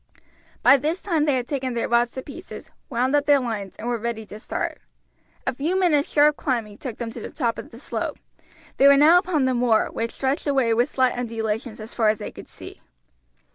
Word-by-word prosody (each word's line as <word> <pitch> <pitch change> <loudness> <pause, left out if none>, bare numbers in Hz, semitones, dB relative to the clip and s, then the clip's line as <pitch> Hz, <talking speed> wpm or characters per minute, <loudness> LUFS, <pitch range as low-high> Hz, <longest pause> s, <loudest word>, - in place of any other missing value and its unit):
By 275 - +7
this 310 +7 -1
time 325 -6 0
they 290 -3 +2
had 250 -1 -2
taken 260 -4 -3
their 235 - -1
rods 240 0 +2
to 260 - -6
pieces, 340 +6 -10 0.2
wound 255 +1 0
up 290 0 +1
their 290 -1 +6
lines, 215 -6 -4
and 230 - -7
were 240 -1 -1
ready 225 -1 -4
to 210 - -10
start. - - -4 0.7
A - - 0
few 320 +9 -1
minutes' 305 -6 +2
sharp 295 0 +4
climbing 225 -6 -2
took 245 -5 -6
them 235 -2 -5
to - - -8
the - - -6
top 235 -6 -2
of - - -9
the 230 - -13
slope. 265 - -4 0.6
They 275 - +6
were 280 0 +7
now 320 +5 +7
upon 340 -7 0
the 260 - +1
moor, 240 -3 +2
which 230 0 -2
stretched 270 +3 -2
away 265 -5 +2
with 240 +5 +2
slight 260 -3 +1
undulations 225 -1 -3
as 215 +1 -9
far 225 -3 +1
as 215 - +1
they - - -6
could - - -12
see. - - -12
255 Hz, 220 wpm, -23 LUFS, 230-290 Hz, 0.7 s, By